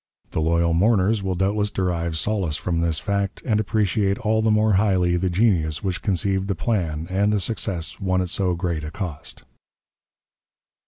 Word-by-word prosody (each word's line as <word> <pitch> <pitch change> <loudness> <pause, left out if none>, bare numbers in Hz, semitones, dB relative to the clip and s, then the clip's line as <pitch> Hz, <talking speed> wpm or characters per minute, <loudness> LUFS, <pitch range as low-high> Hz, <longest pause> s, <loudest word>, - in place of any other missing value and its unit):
The - - -1
loyal 85 +1 +2
mourners 100 +3 +3
will 95 -1 -2
doubtless 100 +3 +1
derive 85 -4 -2
solace 90 -4 -1
from 85 -2 -2
this 85 -2 +1
fact, 100 +1 -2
and 110 -4 +2
appreciate 105 -1 +1
all 110 -2 +1
the 110 - +2
more 105 0 +3
highly 95 -3 +2
the 90 +1 0
genius 85 -6 +1
which 95 -2 -2
conceived 95 -1 0
the 100 - -1
plan, 85 -8 -1
and 100 +3 +2
the 105 - +1
success 90 -6 -3
won 95 -2 0
at 90 -1 -1
so 90 -3 0
great 85 -3 -2
a 75 - -4
cost." 85 -4 -7
95 Hz, 170 wpm, -23 LUFS, 85-105 Hz, -, mourners